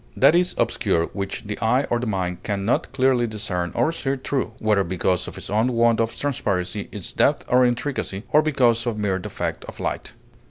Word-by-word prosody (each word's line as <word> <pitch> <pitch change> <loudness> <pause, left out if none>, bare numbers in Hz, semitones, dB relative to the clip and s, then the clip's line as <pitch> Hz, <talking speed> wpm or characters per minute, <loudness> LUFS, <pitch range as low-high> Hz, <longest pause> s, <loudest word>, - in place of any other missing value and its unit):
That 135 +4 +6
is 180 +1 +2
obscure 85 0 +1
which 100 +4 -4
the 105 -1 -5
eye 125 +5 +2
or 120 - +2
the 120 - -3
mind 90 -4 -2
can 100 -2 -2
not 115 - 0
clearly 130 -2 +2
discern 90 -5 -3
or 155 - +2
see 140 -5 -2
through, 130 0 -2
whether 105 -2 +2
because 90 0 0
of - - -8
its - - -7
own 110 +4 +2
want 115 -1 +3
of 115 0 0
transparency, 105 -8 -2
its 100 -4 -6
depth - - +2
or 125 +1 +4
intricacy, 120 -5 -1
or 150 - +6
because 125 -6 +2
of 115 -3 -1
mere 100 -3 0
defect - - -4
of - - -10
light. - - -3
115 Hz, 200 wpm, -23 LUFS, 100-130 Hz, -, That